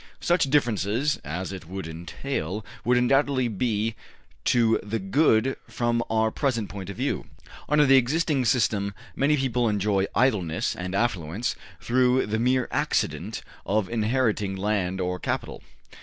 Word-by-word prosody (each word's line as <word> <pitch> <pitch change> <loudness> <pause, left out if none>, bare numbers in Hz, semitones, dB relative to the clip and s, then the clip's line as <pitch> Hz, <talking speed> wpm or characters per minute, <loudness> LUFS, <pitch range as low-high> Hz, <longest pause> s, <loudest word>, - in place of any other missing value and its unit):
Such 175 -5 +2
differences 120 0 +1
as 90 +5 -4
it 90 -3 -8
would 95 -2 -5
entail 85 - -4 0.2
would 125 +1 +3
undoubtedly 130 +1 +2
be 110 0 -1 0.5
to 115 -2 +3
the 105 +2 -3
good 115 +3 +2
from 120 -1 0
our 110 0 +2
present 115 -7 -1
point 100 -2 -7
of 100 - -7
view. - - -2 0.4
Under 150 0 +5
the 135 0 +6
existing 140 +1 +1
system 105 -4 +1 0.2
many 150 +2 +2
people 125 -3 +1
enjoy 100 -1 +1
idleness 100 -11 +1
and 90 +1 -4
affluence 100 -2 -1 0.2
through 125 +1 +2
the 110 +1 -1
mere 125 +1 +2
accident - - -1 0.2
of 105 -1 0
inheriting 110 -3 0
land 95 -2 -1
or 90 0 -2
capital. - - -3
110 Hz, 140 wpm, -26 LUFS, 100-130 Hz, 0.5 s, the